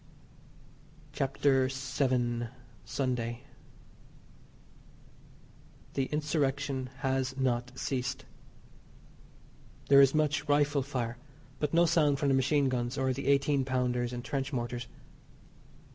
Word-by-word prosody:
CHAPTER 135 -1 +2
VII. 130 -3 -1 0.4
SUNDAY. 125 -2 -2 2.5
The 135 - 0
Insurrection 145 -3 -1
has 135 0 -1
not 125 -2 0
ceased. 135 0 -3 1.6
There 140 0 +8
is 135 +1 +5
much 150 -1 +1
rifle 145 0 +3
fire, 125 -3 -3 0.4
but 150 -1 -1
no 170 +1 +6
sound 155 -4 +3
from 145 -1 +1
the - - +3
machine 140 +2 +2
guns 125 0 -2
or 130 -1 +1
the - - -5
eighteen 140 0 +3
pounders 125 -2 0
and 120 0 -6
trench 135 0 -2
mortars. 120 -2 -3
135 Hz, 100 wpm, -30 LUFS, 125-145 Hz, 2.5 s, There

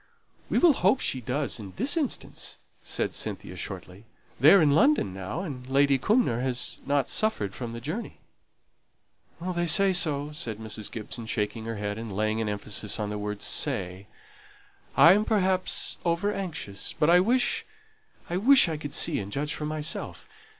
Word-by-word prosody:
"We - - +1
will 345 -4 +6
hope 210 +2 +2
she 130 - -1
does 130 +2 -2
in 100 -3 -9
this 265 +8 +1
instance," 300 -6 -3 0.2
said - - -2
Cynthia, - - -4
shortly. - - -7 0.3
"They're 200 - +8
in 150 -4 +4
London 160 - +3
now, 95 - -5
and 135 -9 -7
Lady 140 0 +3
Cumnor 205 - +2
hasn't 130 +2 -1
suffered 110 - 0
from 120 -2 -6
the 115 - -6
journey." 165 - -5 1.2
"They 175 0 -2
say 195 +3 +5
so," 150 -4 0
said 120 -9 -4
Mrs. 110 -1 -5
Gibson, 115 0 -7
shaking 110 0 -2
her 115 0 -4
head, 105 +1 -4
and 110 -4 -6
laying 110 +2 0
an 110 - -1
emphasis 105 0 -3
on 105 -1 -2
the 105 - -4
word 105 0 -4
"say." 95 +2 -1 0.9
"I 165 +6 +9
am 210 +2 +2
perhaps 190 -4 0
over 175 +4 0
anxious, 155 - -4
but 150 +2 +2
I 175 - +7
wish 245 +6 +2 0.6
I 175 - -2
wish 250 +3 +6
I 160 -2 -2
could 145 -1 -5
see 165 - +2
and 100 0 -6
judge 145 +6 -2
for 150 - -4
myself. 155 0 -4
145 Hz, 165 wpm, -27 LUFS, -, 1.2 s, I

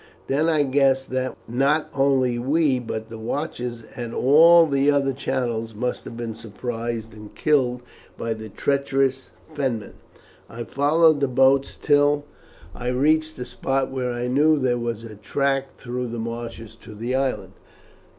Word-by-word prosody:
Then 150 +4 +1
I 155 -3 +3
guessed 135 -1 +2
that 130 0 -2
not 140 +6 +1
only 135 -3 +2
we 140 +1 +2
but 110 -2 -5
the 115 - -7
watchers 120 -1 -4
at 120 -3 -5
all 165 +5 +7
the 140 -1 +2
other 140 -2 +2
channels 120 -4 -3
must 125 +3 -3
have 115 - -8
been 115 -1 -4
surprised 115 0 -5
and 105 -1 -12
killed 125 -5 +1 0.3
by 115 0 -2
the 110 0 -9
treacherous 135 +1 0 0.2
Fenmen. 130 -8 -2 0.6
I 120 +1 -6
followed 150 +4 +3
the 140 - +2
boats 135 +2 +3
till 145 0 +3 0.5
I 125 - -6
reached 155 +5 +1
a 125 - -5
spot 135 +2 -2
where 130 -2 -2
I 120 0 -3
knew 150 +5 +3
there 125 -3 +1
was 115 -1 -3
a 115 -2 -9
track 135 +5 -1
through 125 0 -4
the 120 0 -5
marshes 115 -1 -6
to 105 - -12
the 120 +4 -3
island. 135 0 -1
130 Hz, 155 wpm, -23 LUFS, 120-140 Hz, 0.6 s, all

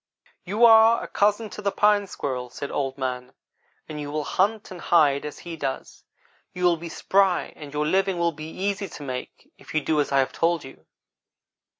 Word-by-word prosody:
"'You 210 +6 +3
are 225 0 +6
a - - -6
cousin 210 +1 +1
to - - -7
the 200 -1 0
Pine 205 0 +3
squirrel,' 130 -7 -4
said 140 - -6
Old 135 -1 -2
man, 125 -1 -4 0.5
'and 150 -1 -6
you 145 - -5
will 150 +1 -2
hunt 200 +7 0
and 180 -2 -8
hide 145 -5 +3
as 150 - -6
he 170 -1 -8
does. 135 -4 -5 0.5
You 180 - -4
will 175 -1 +4
be 170 +1 -8
spry 190 +2 +1
and 145 -2 -10
your 150 +1 -1
living 190 +3 +1
will 170 0 +1
be 155 0 -8
easy 200 +3 -3
to 145 - -9
make 130 -2 -7
if - - -11
you 155 - +3
do 150 +1 +1
as 145 - -3
I 140 - +3
have 135 -1 +1
told 165 -1 +1
you.' 135 - -14
165 Hz, 205 wpm, -24 LUFS, 145-195 Hz, 0.5 s, are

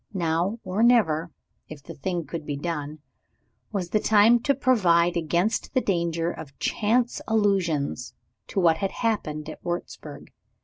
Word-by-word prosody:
Now 175 +4 0
or 190 +4 -2
never 185 -9 +3 0.4
(if 150 -3 -10
the - - -9
thing 175 +2 -3
could 165 -2 -6
be 145 -1 -4
done) 150 -1 -4 0.7
was 185 -5 -3
the 215 - +3
time 220 +3 +5
to 280 +4 +1
provide 175 -10 +3
against 175 - -1
the - - +5
danger 170 -5 -1
of 145 -5 -10
chance 235 +3 0
allusions 190 - 0 0.3
to - - -2
what 165 -3 +4
had 195 - -1
happened 155 -10 -2
at 155 - -9
Wurzburg. 175 0 -6
175 Hz, 145 wpm, -25 LUFS, 160-215 Hz, 0.7 s, time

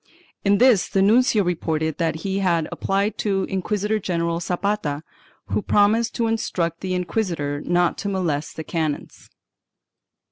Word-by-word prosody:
In 200 0 +4
this 240 -6 +4
the 195 - +1
nuncio 225 +1 +4
reported 160 -3 -1
that 160 -1 -1
he 195 0 0
had 170 -4 +1
applied 200 +2 -1
to 195 -2 0
Inquisitor 210 +3 -1
general 170 -3 -1
Zapata, 175 -4 -2 0.5
who - - 0
promised 215 +3 +2
to 235 - 0
instruct 175 -7 -1
the 185 -1 -2
inquisitor 170 -6 -2
not 175 0 +1
to 200 - -2
molest 165 -6 -2
the 160 - -5
canons. 155 -3 -4
185 Hz, 140 wpm, -23 LUFS, 165-205 Hz, 0.5 s, In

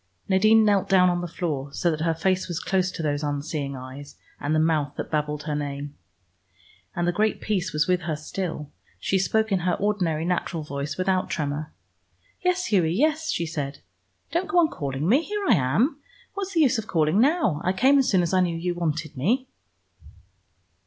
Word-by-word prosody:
Nadine 215 +3 +5
knelt 200 -3 +2
down 180 -2 +5
on 175 0 -1
the 175 - -3
floor, 150 -5 -3
so 170 - +1
that 155 -1 -3
her 165 0 +1
face 185 +3 0
was 175 -2 -3
close 185 -1 0
to 165 - -5
those 145 -1 0
unseeing 145 -1 -3
eyes, 130 +2 -9 0.2
and 145 +2 -1
the - - +3
mouth 155 -3 +1
that - - -5
babbled 150 -1 -1
her 150 -1 -3
name. 145 0 -4 1.0
And 175 0 0
the - - +3
great 215 +4 0
peace 190 -4 -1
was 150 -1 +1
with 180 -1 +2
her 160 -2 -2
still. 155 -1 -5 0.3
She 190 - +1
spoke 220 +4 +1
in 190 - +2
her 180 0 0
ordinary 180 -6 0
natural 175 -2 -1
voice 140 0 -4
without 185 0 0
tremor. 150 0 -3 0.7
"Yes, 360 0 +1
Hughie, 175 -5 +3
yes," 310 +6 +1
she 170 - 0
said. 145 -3 -5 0.5
"Don't 350 +2 0
go 375 - +1
on 335 -3 +5
calling 140 - -3
me. 255 - +5
Here 410 +3 -4
I - - +6
am. 195 - +1 0.3
What's 390 -2 -5
the 325 - +4
use 260 -5 +3
of 215 - -6
calling 160 +4 +2
now? 275 - +2
I 185 - +2
came 265 +9 +4
as 265 - +2
soon 185 -3 +3
as 170 - -2
I 185 - +4
knew 175 -2 +1
you 175 +1 -1
wanted 155 -3 -3
me." 245 - 0
175 Hz, 200 wpm, -25 LUFS, 150-210 Hz, 1.0 s, I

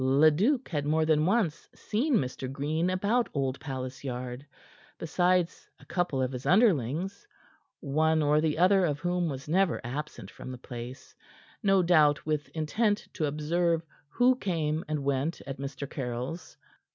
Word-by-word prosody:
Leduc 155 - +3
had 150 -4 -1
more 155 +2 +2
than 155 0 +3
once 185 -6 0
seen 250 +7 0
Mr. 130 - -2
Green 155 +5 -1
about 205 +6 +1
Old 135 -1 -1
Palace 130 -2 -6
Yard, 125 0 -5 0.5
besides 180 +1 0
a - - -17
couple 175 -8 -1
of 130 - -1
his 125 -1 -6
underlings, 185 - +2 0.5
one 155 +2 +2
or 150 +1 +3
the 155 -1 0
other 185 +3 +5
of 150 -5 +1
whom 175 +1 -1
was 135 -1 -6
never 180 +2 +2
absent 145 +6 -6
from 130 - -9
the 130 - -7
place, 125 +1 -9 0.5
no 195 -2 +4
doubt 155 -4 +4
with 150 -1 -1
intent 205 +7 0
to 155 - -1
observe 165 +3 0 0.2
who 250 +8 +4
came 160 -6 -1
and 150 -2 -2
went 140 +4 -1
at 135 -1 -6
Mr. 140 0 -5
Caryll's. 130 +5 -5
155 Hz, 150 wpm, -29 LUFS, 135-180 Hz, 0.5 s, other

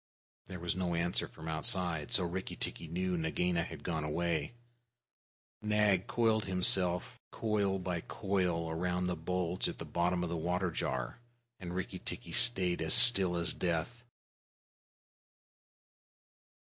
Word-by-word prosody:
There 90 - -8
was 85 0 -3
no 90 -2 -2
answer 85 +1 -1
from 80 - -12
outside, 80 -1 -1
so 95 - +6
Rikki 90 +2 -5
tikki 85 - -5
knew 90 +3 -3
Nagaina 85 +1 -1
had - - -10
gone 80 -3 -3
away. 80 +3 -3 1.1
Nag 105 -3 +1
coiled 110 -3 0
himself 90 -1 0
down, - - -15
coil 105 -3 0
by 90 -2 -4
coil, 90 -5 -2
round 90 +2 -2
the 90 - -2
bulge 90 +2 -3
at - - -8
the - - -8
bottom 90 +1 -1
of 85 - -4
the - - -2
water 90 +2 -2
jar, 65 - -4 0.4
and 90 -1 -7
Rikki 95 - -5
tikki - - -6
stayed 95 -8 +5
still 95 -6 +9
as 85 0 0
death. 90 +8 -3
90 Hz, 135 wpm, -32 LUFS, 85-95 Hz, 1.1 s, still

